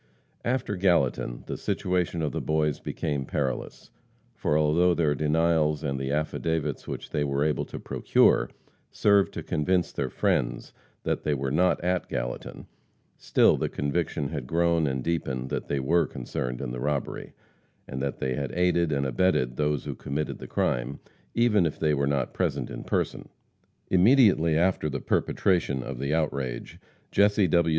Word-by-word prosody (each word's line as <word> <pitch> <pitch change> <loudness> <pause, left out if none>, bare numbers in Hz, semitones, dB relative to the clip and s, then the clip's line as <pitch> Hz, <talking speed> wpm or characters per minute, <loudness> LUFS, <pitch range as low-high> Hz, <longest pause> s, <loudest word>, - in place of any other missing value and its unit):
After 120 -4 -1
Gallatin, 85 -10 +1
the - - -4
situation 90 -2 -1
of 75 - 0
the - - -3
boys 75 -2 0
became 75 -4 -3
perilous, 65 -1 -3 0.4
for 75 - 0
although 85 +4 +3
their 75 -4 +2
denials 75 +1 +1
and 70 -3 -2
the 65 0 -3
affidavits 75 -1 -2
which - - -6
they 75 - 0
were 70 0 0
able 75 0 0
to - - -8
procure, - - +3 0.4
served 100 -2 +3
to - - -4
convince 90 +3 0
their 65 -2 -2
friends - - -1 0.3
that - - -1
they 75 - 0
were 65 -1 -2
not 90 +5 +3
at 90 0 0
Gallatin; - - -4 0.5
still - - +3
the - - -1
conviction 75 0 -2
had 70 -6 -5
grown 85 0 +2
and 65 -2 -2
deepened 65 -6 -2
that - - -3
they 70 - -1
were 80 +4 +2
concerned 60 -1 -4
in 65 -3 -4
the 60 - -5
robbery, 70 +1 -3 0.5
and 65 - -5
that 70 -1 -2
they 65 0 -1
had 70 -1 -3
aided 85 -1 +2
and 70 -1 0
abetted 65 -2 +1
those 75 0 0
who - - -3
committed 75 +3 -4
the - - -8
crime, - - -1 0.4
even 115 -5 +4
if 80 -3 -1
they 75 -1 +1
were 70 -1 +1
not 70 -1 -1
present - - -1
in - - -6
person. - - -2 0.6
Immediately 95 - +5
after 85 -2 +1
the 70 -1 -3
perpetration 75 -8 +1
of 65 -1 -6
the 70 +2 -2
outrage, 70 -6 -2 0.3
Jesse 100 -1 +4
W. 85 0 +3
75 Hz, 165 wpm, -27 LUFS, 70-85 Hz, 0.6 s, Immediately